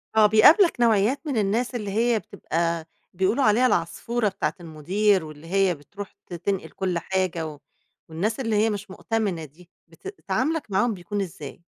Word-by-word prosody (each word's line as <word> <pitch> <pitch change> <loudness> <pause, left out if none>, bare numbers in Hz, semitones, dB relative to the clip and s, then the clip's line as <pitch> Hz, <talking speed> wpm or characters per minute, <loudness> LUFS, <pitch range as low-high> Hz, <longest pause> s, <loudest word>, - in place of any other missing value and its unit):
آه، 215 - +6
بيقابلك 295 - +6
نوعيّات 230 +4 +3
من 265 -6 -1
الناس 225 +5 0
اللي 210 -4 -3
هي 230 +2 +2
بتبقى 170 -5 -2 0.3
بيقولوا 195 +9 +1
عليها 220 +4 +4
العصفورة 215 +5 0
بتاعة 190 - -2
المدير، 180 +4 +1
واللي 155 +1 -11
هي 190 0 +2
بتروح 195 +8 -10
ت - - -11
تنقِل 185 +3 -2
كل 185 -3 -2
حاجة 185 -3 -1
و 150 -2 -9 0.5
والناس 205 +10 -2
اللي 225 -4 -1
هي 215 +2 +3
مش 205 -1 -5
مؤتَمِنة 195 -6 -2
دي، 165 +5 -18 0.2
بت 165 - -13 0.2
تعامُلك 260 +5 -1
معاهم 220 +4 +2
بيكون 200 +2 -4
إزاي؟ 165 -3 -8
195 Hz, 165 wpm, -24 LUFS, 170-225 Hz, 0.5 s, آه